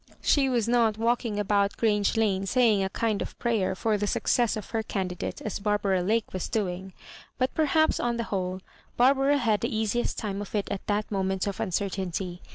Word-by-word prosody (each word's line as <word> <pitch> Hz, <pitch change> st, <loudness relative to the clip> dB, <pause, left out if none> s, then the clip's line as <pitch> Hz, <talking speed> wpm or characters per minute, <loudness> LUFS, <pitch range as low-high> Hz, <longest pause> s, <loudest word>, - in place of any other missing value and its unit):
She 275 Hz, -2 st, +3 dB
was 235 Hz, -3 st, +1 dB
not 230 Hz, -3 st, +3 dB
walking 230 Hz, -2 st, 0 dB
about 200 Hz, 0 st, +1 dB
Grange 210 Hz, -1 st, +1 dB
Lane 195 Hz, -3 st, +1 dB
saying 225 Hz, -4 st, +3 dB
a 190 Hz, -, -1 dB
kind 215 Hz, 0 st, -1 dB
of -, -, -6 dB
prayer 220 Hz, -6 st, 0 dB
for 215 Hz, +1 st, 0 dB
the 205 Hz, -, -1 dB
success 235 Hz, 0 st, +1 dB
of 215 Hz, -, -8 dB
her 225 Hz, -1 st, 0 dB
candidate, 185 Hz, -5 st, -4 dB
as 210 Hz, -, -3 dB
Bar 210 Hz, 0 st, +1 dB
bara 195 Hz, -3 st, +1 dB
Lake 215 Hz, +4 st, 0 dB
was 185 Hz, -, -3 dB
doing; 190 Hz, -3 st, -2 dB, 0.4 s
but 255 Hz, 0 st, 0 dB
perhaps, 315 Hz, 0 st, +2 dB
on 240 Hz, -1 st, 0 dB
the 235 Hz, -, -1 dB
whole, 185 Hz, -3 st, -3 dB, 0.4 s
Barbara 270 Hz, +3 st, +4 dB
had 225 Hz, -6 st, +1 dB
&e -, -, +2 dB
easiest 220 Hz, +2 st, -1 dB
time 205 Hz, -2 st, -3 dB
of 205 Hz, -, -7 dB
it 205 Hz, -, 0 dB
at 200 Hz, -, -4 dB
that 210 Hz, +1 st, -1 dB
moment 190 Hz, -1 st, 0 dB
of 200 Hz, -2 st, -4 dB
uncertainty. 185 Hz, -1 st, -2 dB
210 Hz, 195 wpm, -27 LUFS, 195-235 Hz, 0.4 s, Barbara